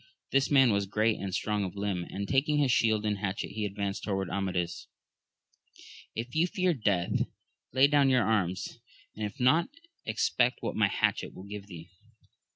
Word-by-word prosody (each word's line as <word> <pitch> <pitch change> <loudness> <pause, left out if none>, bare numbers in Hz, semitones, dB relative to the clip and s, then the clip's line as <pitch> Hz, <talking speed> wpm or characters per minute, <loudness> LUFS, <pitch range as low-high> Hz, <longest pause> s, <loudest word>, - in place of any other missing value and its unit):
This 135 0 +2
man 135 -4 +5
was 100 -1 0
great 110 +2 +1
and 95 -1 -4
strong 105 +2 -1
of 95 0 -5
limb, 100 -3 -2
and 100 +1 -4
taking 145 +3 +2
his 140 -3 +3
shield 110 -3 +2
and 105 -2 0
hatchet 100 -1 -3
he 105 0 -3
advanced 100 0 -3
towards 95 -3 -2
Amadis; 90 -3 -2 0.6
— - - -20
If 120 +2 -5
you 165 +3 +3
fear 180 0 +1
death 100 - 0 0.4
lay 130 +2 +5
down 140 -1 +4
your 125 -3 +4
arms, 95 -4 -1 0.3
if 105 +5 -5
not, 155 +8 +3 0.3
expect 120 +3 +1
what - - -2
my - - +4
hatchet - - -1
will 95 - -9
give 100 0 -8
thee 85 -2 -11
105 Hz, 170 wpm, -29 LUFS, 100-130 Hz, 0.6 s, man